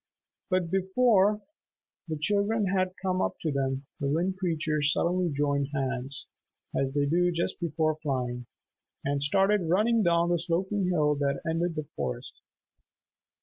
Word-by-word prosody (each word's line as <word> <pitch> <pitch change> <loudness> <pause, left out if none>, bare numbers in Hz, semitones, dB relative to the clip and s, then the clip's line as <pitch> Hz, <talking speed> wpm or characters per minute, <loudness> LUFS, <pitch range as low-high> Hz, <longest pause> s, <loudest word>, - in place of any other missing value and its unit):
But 185 -3 0
before 200 +1 +3 0.7
the 160 -1 -3
children 205 +6 +1
had 185 -1 0
come 185 -1 +1
up - - -1
to 160 - -1
them, 135 0 -1
the 140 - -1
Wind 170 +6 0
Creatures 155 -4 +1
suddenly 180 +2 +1
joined 140 -1 0
hands, 135 0 -3 0.5
as 135 -1 0
they 145 -1 +2
do 175 +4 +2
just 170 0 -2
before 155 -2 0
flying, 125 -4 -2 0.6
and 140 0 0
started 195 +4 +2
running 220 +6 +3
down 170 -2 +3
the 175 -1 +2
sloping 185 +3 0
hill 155 -5 +2
that 140 -1 0
ended 165 +1 0
the 155 -2 -3
forest. - - -4
170 Hz, 145 wpm, -28 LUFS, 145-185 Hz, 0.7 s, before